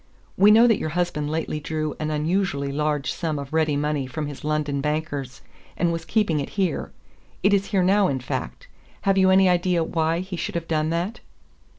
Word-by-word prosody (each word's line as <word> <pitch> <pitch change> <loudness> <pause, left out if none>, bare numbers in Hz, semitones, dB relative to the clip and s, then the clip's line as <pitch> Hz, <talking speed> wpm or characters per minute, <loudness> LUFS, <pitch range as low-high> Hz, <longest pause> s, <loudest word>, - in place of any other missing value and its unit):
"We 200 +2 +6
know 225 +3 +7
that 225 -4 +3
your 155 - -2
husband 150 -4 -1
lately 155 -1 -2
drew 155 0 -3
an 155 - -2
unusually 150 -2 -1
large 150 -1 -1
sum 160 -4 -2
of 140 +1 -7
ready 160 -2 +2
money 145 -2 -1
from 150 +4 -4
his 145 -2 -8
London 150 -2 -1
bankers, 145 -3 -3 0.3
and 170 -1 +1
was 165 -1 -4
keeping 175 -5 +1
it 140 - -4
here. 185 -6 -1 0.5
It 200 +2 +4
is 200 0 +2
here 195 -4 +1
now, 195 +2 +4
in 135 -5 -1
fact. 65 - -5 0.3
Have 195 -1 +2
you 190 0 +5
any 190 0 +5
idea 180 -1 +2
why 165 +1 0
he 185 -1 -6
should 170 - -4
have 165 -1 -3
done 155 -1 0
that?" 175 +8 -2
160 Hz, 200 wpm, -24 LUFS, 150-185 Hz, 0.5 s, know